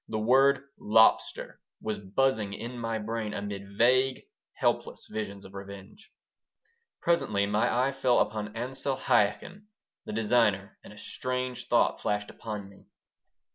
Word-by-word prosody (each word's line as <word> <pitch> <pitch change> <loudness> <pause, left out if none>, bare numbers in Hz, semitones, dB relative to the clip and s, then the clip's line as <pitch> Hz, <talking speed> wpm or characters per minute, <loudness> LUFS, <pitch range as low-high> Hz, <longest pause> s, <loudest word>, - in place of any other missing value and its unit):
The 110 - -3
word 135 +5 +4 0.2
"lobster" 110 +1 +3 0.2
was 110 -1 -3
buzzing 105 0 0
in 120 +3 -6
my 115 -1 -2
brain 110 0 -3
amid 100 -1 -6
vague, 130 +2 +3 0.3
helpless - - -1
visions 100 -2 -5
of 95 - -13
revenge 100 - -11 0.9
Presently 105 -12 +2
my 105 +1 +1
eye 130 +3 +2
fell 130 -2 +2
upon 105 0 -1
Ansel 130 +2 -2
Chaikin, 125 - +1 0.4
the - - -6
designer, 105 -3 +1
and - - -12
a 105 - -14
strange 125 +1 -4
thought - - +2
flashed 105 0 -1
upon 105 -3 -6
me. 100 0 -18
110 Hz, 135 wpm, -29 LUFS, 100-125 Hz, 0.9 s, word